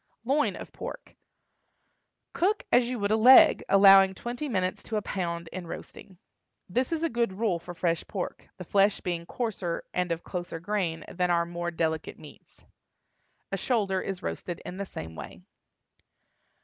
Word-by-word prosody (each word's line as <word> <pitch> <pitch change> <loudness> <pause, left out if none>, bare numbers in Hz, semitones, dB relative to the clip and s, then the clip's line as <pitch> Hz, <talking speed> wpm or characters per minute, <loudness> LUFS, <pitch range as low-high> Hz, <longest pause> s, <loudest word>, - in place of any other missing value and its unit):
LOIN 285 +4 +1
OF - - -9
PORK. - - -8 1.2
Cook 400 +5 +1
as 245 0 +4
you 250 - -2
would 205 -1 -1
a - - +5
leg, 250 +4 +7
allowing 195 -1 +7
twenty 245 +8 -5
minutes 185 -2 -1
to 225 - -5
a - - 0
pound 170 -3 -3
in 180 0 -7
roasting. 180 +2 -10 0.5
This 250 - -1
is 330 -1 -1
a - - +3
good 235 -7 -1
rule 195 -4 0
for 175 +1 -9
fresh 165 -1 0
pork, 190 -3 -5
the 180 - -7
flesh 200 +3 +2
being 170 -2 -3
coarser 200 -8 -3
and 180 -1 -1
of 170 0 -2
closer 175 -2 -5
grain 170 -4 -2
than 180 0 -1
are 170 -1 +2
more 175 0 -4
delicate 160 -2 -2
meats. - - -16 0.9
A - - -1
shoulder 200 -7 0
is 195 -1 -5
roasted 175 -2 -4
in 180 - -7
the 200 0 -4
same 80 - -8
way. - - -9
190 Hz, 165 wpm, -28 LUFS, 175-220 Hz, 1.2 s, leg